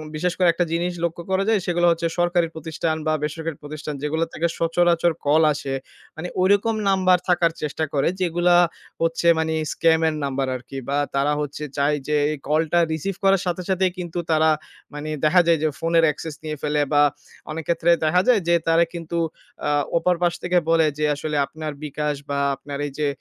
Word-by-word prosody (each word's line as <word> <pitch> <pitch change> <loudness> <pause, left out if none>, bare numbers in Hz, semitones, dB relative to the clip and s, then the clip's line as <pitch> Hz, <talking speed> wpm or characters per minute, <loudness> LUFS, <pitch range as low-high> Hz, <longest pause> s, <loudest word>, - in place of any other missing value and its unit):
বিশেষ 175 +3 0
করে 180 - +3
একটা 175 +1 0
জিনিস 175 +2 -1
লক্ষ্য 170 0 -2
করা 190 +1 +2
যায় 220 -2 +3
সেগুলো 175 0 +2
হচ্ছে, 165 0 0
সরকারি 175 -1 +2
প্রতিষ্ঠান 160 0 -2
বা 155 - +2
বেসরকারী 160 0 -4
প্রতিষ্ঠান 150 +1 -6
যেগুলো 160 +2 0
থেকে 170 - 0
সচরাচর 170 0 +2
কল 150 +3 +4
আসে। 140 -1 -4 0.4
মানে 160 +3 -5
ঐরকম 205 +4 +3
নাম্বার 185 -1 +4
থাকার 175 -2 +3
চেষ্টা 155 +1 -2
করে 140 -2 +1
যেগুলা 175 0 +3 0.5
হচ্ছে 165 +1 +1
মানে 160 0 0 0.2
স্কাম 165 -1 +3
এর 155 - -4
নাম্বার 135 -1 -1
আরকি 130 +2 -8
বা 140 - +1 0.2
তারা 140 +2 +2
হচ্ছে 145 +1 -5
চায় 140 - +2 0.2
যে 150 - +1 0.2
এই 155 - -3
কলটা 160 +3 +2
রিসিভ 170 +5 -3
করার 195 -1 +4
সাথে, 180 0 -2
সাথেই 190 -1 +2
কিন্তু 175 -1 -4
তারা 160 0 +4 0.4
মানে 150 +1 -6 0.2
দেখা 180 +4 +6
যায় 165 -2 +4
যে - - +3
ফোনের 165 0 +2
অ্যাক্সেস 150 +1 -3
নিয়ে 155 -1 -4
ফেলে 150 0 0
বা 145 - +5 0.5
অনেক 160 +1 -4
ক্ষেত্রে 170 0 +2
দেখা 175 +4 +3
যায় 240 -5 +5
যে, 170 - +4
তারা 165 +1 +5
কিন্তু 170 0 -5 0.5
আ - - +1 0.3
ওপার 180 +1 +2
পাশ 175 -1 +2
থেকে 180 0 +1
বলে 165 -1 +4
যে 150 - 0
আসলে 150 +1 -4
আপনার 155 +1 -6
bKash 150 -1 -3
বা 140 0 -1 0.2
আপনার 140 +1 -7
এইযে 145 +1 -2
165 Hz, 190 wpm, -22 LUFS, 150-175 Hz, 0.5 s, দেখা